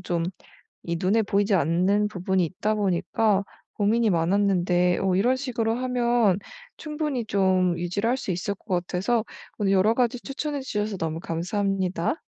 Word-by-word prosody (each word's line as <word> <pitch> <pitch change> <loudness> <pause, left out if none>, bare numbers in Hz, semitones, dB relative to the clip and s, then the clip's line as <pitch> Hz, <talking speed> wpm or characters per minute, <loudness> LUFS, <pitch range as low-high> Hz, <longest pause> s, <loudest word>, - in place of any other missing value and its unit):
좀 175 -2 -2 0.6
이 170 0 -2
눈에 195 +6 +2
보이지 200 0 +1
않는 185 +5 +2
부분이 190 -1 0
있다 190 +6 -1
보니까 200 +1 +1 0.3
고민이 220 +2 +2
많았는데 180 0 +2
어 190 -1 +2
이런 245 +8 +3
식으로 235 -4 -1
하면 240 -5 +2 0.4
충분히 300 -6 -3
좀 185 -3 +2
유지를 180 +6 -1
할 250 - +2
수 260 - -5
있을 185 +3 -2
것 200 - -29 0.2
같아서 215 +5 0 0.3
오늘 200 -2 +1
여러 195 +3 +4
가지 250 +1 +1
추천해 285 +1 -4
주셔서 210 -4 -2
너무 160 -2 -3
감사합니다. 185 - -1
200 Hz, 320 characters per minute, -25 LUFS, 180-230 Hz, 0.6 s, 여러